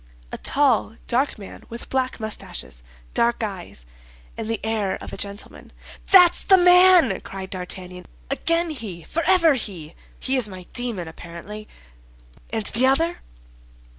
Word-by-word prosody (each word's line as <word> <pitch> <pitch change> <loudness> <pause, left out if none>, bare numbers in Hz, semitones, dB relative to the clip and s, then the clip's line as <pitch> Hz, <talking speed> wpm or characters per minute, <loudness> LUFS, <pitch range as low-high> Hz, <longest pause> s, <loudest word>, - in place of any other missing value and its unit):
"A - - -5
tall, 265 -6 +1
dark 265 +3 0
man, 200 -2 -11
with 235 +1 -8
black 260 -1 -1
mustaches, 65 - -6 0.3
dark 235 0 +1
eyes, 185 - -6 0.5
and 215 - -5
the 225 - -1
air 215 -3 -1
of - - -9
a - - -4
gentleman." 200 +1 -7 0.4
"That's 360 -2 +7
the 380 - +7
man!" 360 - +6
cried 190 -1 -8
D'Artagnan, 180 -1 -6 0.2
"again 335 +4 +1
he, 210 - -6
forever 335 - +3
he! 180 - -4 0.3
He 265 0 +1
is 235 -5 +2
my 185 -2 -9
demon, 230 -8 -2
apparently. 170 +6 -9 0.8
And 220 -2 -3
the 250 +5 +3
other?" 330 +6 +1
225 Hz, 135 wpm, -23 LUFS, 190-280 Hz, 0.8 s, That's